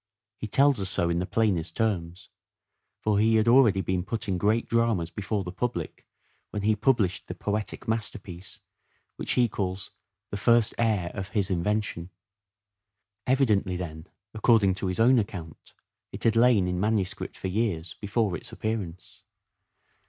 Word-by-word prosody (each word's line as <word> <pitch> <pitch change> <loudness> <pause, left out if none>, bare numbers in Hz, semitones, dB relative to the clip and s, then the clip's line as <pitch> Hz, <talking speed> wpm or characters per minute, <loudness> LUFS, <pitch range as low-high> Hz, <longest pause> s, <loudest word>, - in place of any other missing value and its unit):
He 110 - -4
tells 140 +3 +3
us 95 -1 0
so 85 -2 +2
in 85 - 0
the 90 - -2
plainest 90 -7 0
terms. 90 -6 -2 0.7
For 105 -1 +1
he 110 +1 +4
had 110 +1 +3
already 115 -6 +5
been 90 0 -1
putting 100 -2 -3
great 110 +4 +1
dramas 115 -8 +1
before 105 +1 -2
the 90 - -6
public 125 +6 -4 0.4
when 105 - -4
he 110 +1 +3
published 105 -5 +1
the - - -6
poetic 105 +4 -3
masterpiece 100 -5 -4 0.6
which - - -1
he 125 -1 +3
calls 95 -3 -4 0.2
" 100 0 -60
the 100 - -3
first 115 +2 +3
heir 105 -7 +1
of 95 -1 -5
(his) 100 -1 -1
invention." 95 -1 -1 1.2
Evidently 110 -8 +2
then, 80 -2 -7 0.3
according 110 -3 +4
to 95 +1 -3
his 90 +2 -2
own 125 +2 +5
account, 90 -7 -7 0.4
it - - -8
had 115 0 +3
lain 115 -5 +4
in 90 0 -2
manuscript 105 -2 -1
for - - -4
years 95 -4 -1
before 105 -2 -1
its - - -8
appearance. 95 -6 -5
100 Hz, 155 wpm, -27 LUFS, 90-115 Hz, 1.2 s, already